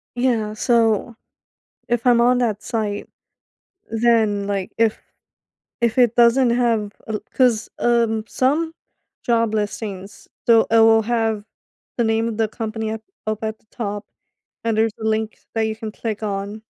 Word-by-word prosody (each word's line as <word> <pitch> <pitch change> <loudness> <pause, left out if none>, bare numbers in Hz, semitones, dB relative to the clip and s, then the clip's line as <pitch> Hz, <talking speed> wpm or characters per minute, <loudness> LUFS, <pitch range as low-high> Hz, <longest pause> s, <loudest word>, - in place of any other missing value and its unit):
Yeah. 235 -4 0
So, 225 0 +1 0.7
if 240 0 -1
I'm 240 -1 +5
on 245 +1 +4
that 220 -4 0
site, 215 -3 -3 0.8
then, 225 -3 +2
like, 195 -2 -2
if 225 -1 +2 0.8
if 235 0 +1
it 240 -2 +5
doesn't 240 +1 +5
have 230 -4 +1
a 220 - -4
l 210 - -2
'cause, 240 -4 +2
um, 230 -2 +2
some 300 +9 0 0.5
job 230 -2 +1
listings 205 -2 -4 0.2
so 230 -1 +6
it 225 - +5
will 225 0 +6
have 225 -2 0 0.5
the 235 - +3
name 225 0 +1
of 225 - -4
the 220 -1 +2
company 220 0 -4
up 220 0 -5 0.2
up 215 0 -2
at 220 0 -3
the - - -37
top 205 -2 -4 0.6
and 230 -1 0
there's 220 0 +2
a - - -5
link 220 0 -1 0.2
that 225 - +1
you 220 - -2
can 220 0 -6
click 220 0 -5
on 205 +1 -4
225 Hz, 155 wpm, -21 LUFS, 215-235 Hz, 0.8 s, so